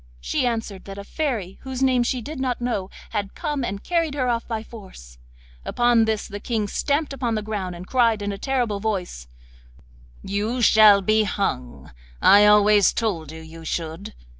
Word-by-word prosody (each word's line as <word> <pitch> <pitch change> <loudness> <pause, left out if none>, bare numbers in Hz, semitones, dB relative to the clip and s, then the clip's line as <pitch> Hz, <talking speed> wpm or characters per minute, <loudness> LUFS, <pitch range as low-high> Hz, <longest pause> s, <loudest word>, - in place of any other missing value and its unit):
She - - -1
answered 225 -5 -4
that 195 0 -8
a 200 - -6
fairy, 220 - -3
whose 265 0 -4
name 255 -2 +3
she 240 0 -1
did 295 +2 -7
not 255 -2 -1
know, 230 -6 -2 0.2
had 205 -3 -3
come 295 -5 -3
and 200 -3 -4
carried 330 -4 0
her 255 -3 0
off 235 -1 -1
by 225 -2 -3
force. 185 - -13 0.4
Upon 240 - +3
this 220 -1 -2
the 205 -1 -7
King 215 -1 -2
stamped 285 +7 -1
upon 245 -4 -2
the 215 - -2
ground, 200 -4 -4
and 175 +1 -9
cried 230 -2 +2
in 205 - -2
a 200 - -5
terrible 245 -7 -1
voice: 185 - -3 1.0
'You 210 +5 -2
shall 215 -3 +6
be 215 +3 +3
hung! 125 - -3 0.3
I 205 - +7
always 210 -1 +5
told 185 -10 -2
you 160 0 -9
you 160 +1 -12
should. 165 +4 -5
215 Hz, 180 wpm, -23 LUFS, 195-245 Hz, 1.0 s, I